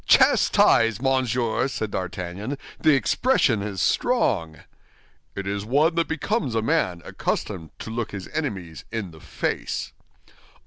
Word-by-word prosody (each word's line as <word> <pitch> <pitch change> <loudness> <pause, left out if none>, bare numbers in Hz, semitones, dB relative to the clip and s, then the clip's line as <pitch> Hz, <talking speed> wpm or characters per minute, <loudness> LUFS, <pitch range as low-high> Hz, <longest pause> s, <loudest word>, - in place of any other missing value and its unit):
"Chastised, 115 -3 +5
Monsieur!" 130 -2 +1
said 110 -6 -3
D'Artagnan, 95 +7 -4 0.2
"the 155 -3 +5
expression 135 - +2
is 100 -3 -2
strong." 90 - +1 0.7
"It 100 - -4
is 100 +1 -2
one 145 +9 +3
that 165 0 +1
becomes 160 - -1
a 110 - +1
man 90 -6 0
accustomed 85 -6 -3
to 110 - -7
look 115 0 -2
his 95 -2 -6
enemies 100 - -4
in 110 -6 -4
the 80 - -14
face." - - -3
110 Hz, 130 wpm, -24 LUFS, 95-135 Hz, 0.7 s, Chastised